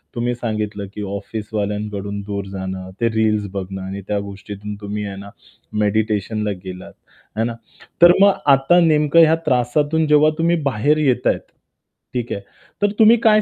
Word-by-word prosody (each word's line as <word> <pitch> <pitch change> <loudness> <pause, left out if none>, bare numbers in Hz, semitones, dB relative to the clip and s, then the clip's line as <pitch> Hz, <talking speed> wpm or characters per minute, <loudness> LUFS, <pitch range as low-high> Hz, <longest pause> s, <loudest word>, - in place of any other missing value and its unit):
तुम्ही 120 +1 -1
सांगितलं 105 -3 -3
की 105 - -6
ऑफिसवाल्यांकडून 105 -1 -4
दूर 100 -1 -4
जाणं, 95 -1 -5
ते 115 - +3
रील्स 110 -2 +1
बघणं 95 0 -5
आणि 95 +1 -6
त्या 105 -1 0
गोष्टीतून 100 +1 -7
तुम्ही 105 0 -4
आहे 100 -1 -6
ना, 100 +1 -9 0.5
मेडिटेशनला 105 0 0
गेलात, 90 0 -8 0.4
आहे 110 +1 0
ना? 120 - -2 0.5
तर 175 0 +10
मग 200 0 +7 0.2
आता 135 +6 +4
नेमकं 150 0 +4
ह्या 160 0 +5
त्रासातून 145 +5 +1
जेव्हा 150 +1 +5
तुम्ही 170 +1 +2
बाहेर 145 +7 +1
येत 130 -5 +1
आहेत - - +2 0.7
ठीक 120 -1 -3
आहे, 100 - -5 0.4
तर 205 0 +3
तुम्ही 225 +2 +7
काय 215 -1 +5
110 Hz, 155 wpm, -20 LUFS, 100-145 Hz, 0.7 s, तर